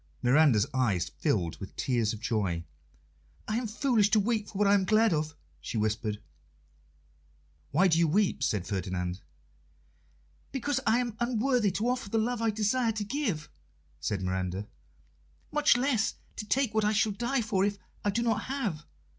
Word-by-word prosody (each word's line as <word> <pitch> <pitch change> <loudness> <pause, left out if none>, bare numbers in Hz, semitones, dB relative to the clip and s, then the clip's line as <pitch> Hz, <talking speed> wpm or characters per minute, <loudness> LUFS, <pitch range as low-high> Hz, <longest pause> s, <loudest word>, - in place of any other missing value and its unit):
Miranda's 125 -4 +5
eyes 105 -10 +1
filled 85 -2 0
with 95 - -8
tears 120 -4 0
of 110 - -6
joy. 100 -7 -1 0.8
"I 215 - 0
am 240 -1 -2
foolish 220 -2 +2
to 215 - +4
weep 215 0 0
for 195 - -8
what 205 0 +3
I 200 - +5
am 200 -2 +4
glad 215 +1 +3
of," 155 0 -2 0.2
she - - -5
whispered. 105 0 -1 1.5
"Why 180 +7 +4
do 165 -2 +3
you 170 - +4
weep?" 195 +5 +1
said 100 -4 0
Ferdinand. 90 -1 -3 1.3
"Because 275 0 -1
I 225 - +5
am 240 -3 -2
unworthy 240 -1 +2
to 215 +5 -1
offer 250 -4 -1
the 225 - 0
love 235 +1 0
I 225 - +2
desire 220 +3 +1
to 215 -1 -3
give," 205 - -2 0.5
said 100 -3 -2
Miranda, 95 +2 -2 0.8
"much 295 -4 +4
less 245 -4 +1 0.2
to 210 - -5
take 260 -1 +1
what 220 0 +2
I 210 +1 +2
shall 215 +1 +2
die 240 +5 -1
for 195 -3 +1
if 200 0 0 0.3
I 205 - +1
do 230 +4 0
not 225 -2 0
have. 230 - -3
205 Hz, 170 wpm, -29 LUFS, -, 1.5 s, Miranda's